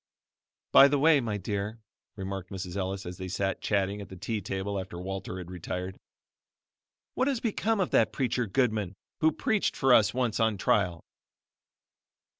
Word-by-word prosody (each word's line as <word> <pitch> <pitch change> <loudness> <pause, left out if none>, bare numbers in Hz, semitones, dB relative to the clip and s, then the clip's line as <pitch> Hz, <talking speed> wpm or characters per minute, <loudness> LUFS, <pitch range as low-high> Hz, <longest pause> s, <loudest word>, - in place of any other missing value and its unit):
"By 140 - +9
the 145 +1 +2
way, 150 +1 +5
my 110 -4 -2
dear," 100 +3 -3 0.4
remarked 95 -2 -5
Mrs. 95 -2 -6
Ellis 95 0 -3
as 90 0 -6
they 95 - -4
sat 95 +1 -2
chatting 100 0 0
at 100 - -9
the 95 - -9
tea 105 +3 -3
table 100 +1 -3
after 95 -2 -7
Walter 95 0 -5
had 90 -1 -8
retired, 90 +1 -5 1.2
"what 255 - +1
has 270 -4 +1
become 225 -1 0
of 185 - 0
that 110 -1 +4
preacher 125 -2 -1
Goodman 105 -4 0 0.2
who 160 0 +4
preached 215 - 0
for 135 -2 +4
us 110 -3 +6
once 120 -3 -1
on 110 -2 +2
trial?" 90 -4 +1
100 Hz, 165 wpm, -29 LUFS, 95-125 Hz, 1.2 s, By